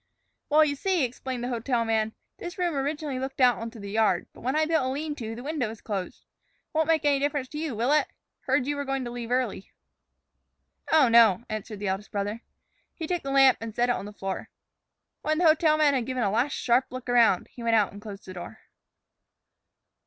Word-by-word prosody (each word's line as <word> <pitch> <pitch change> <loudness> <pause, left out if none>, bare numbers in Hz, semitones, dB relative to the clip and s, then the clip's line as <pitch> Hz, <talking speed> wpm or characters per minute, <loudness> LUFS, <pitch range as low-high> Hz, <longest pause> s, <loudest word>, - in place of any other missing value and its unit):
"Well, 305 +1 +6
you 285 -1 -1
see," 365 +1 +1
explained 250 0 -4
the 245 - -2
hotel 240 0 0
man, 220 -1 0 0.3
"this 350 +2 -7
room 350 -2 0
originally 285 -1 -2
looked 265 +1 -5
out 250 -2 +5
on 230 0 -4
the 205 -4 -9
yard. 215 -4 +2
But - - -15
when 260 +4 -1
I 310 0 +3
built 320 0 +2
on 260 - -1
a - - -1
lean 295 +3 -3
to, 225 -2 -5
the 240 - -8
window 290 -4 -1
was 220 0 -9
closed. 195 -4 -5 0.5
Won't 315 0 +1
make 320 -2 +2
any 285 -1 +3
difference 285 -2 -1
to 300 - -6
you, 310 -6 -3
will 235 +5 +1
it? 300 - +3 0.3
Heard 265 0 +1
you 290 +1 -2
were 285 - -2
going 270 -2 -2
to 240 - -5
leave 240 -1 -6
early." 245 -6 -1 1.2
"Oh, 310 -5 +6
no," 230 -3 +6 0.2
said 215 - -9
the 205 0 -4
eldest 195 +2 -3
brother. 205 +2 -3 0.5
He 325 - -5
took 350 +1 -1
the 275 - -5
lamp 270 -2 +5
and 225 -1 -6
set 240 +1 +2
it 245 - +3
on - - -5
the 205 - -8
floor. 195 -2 -5 0.7
When 310 0 0
the 350 - +2
hotel 310 -1 +5
man 300 -2 +4
had 250 -4 -1
given 255 -2 -1
a 200 - +1
last 245 +7 +1
sharp 250 +2 +2
look 255 0 -8
around, 235 -6 +3
he 245 - -11
went 230 -1 +2
out 210 -3 +3
and 205 - -10
closed 205 -2 -9
the 185 - -8
door. 175 -11 -8
255 Hz, 225 wpm, -27 LUFS, 225-290 Hz, 1.2 s, Well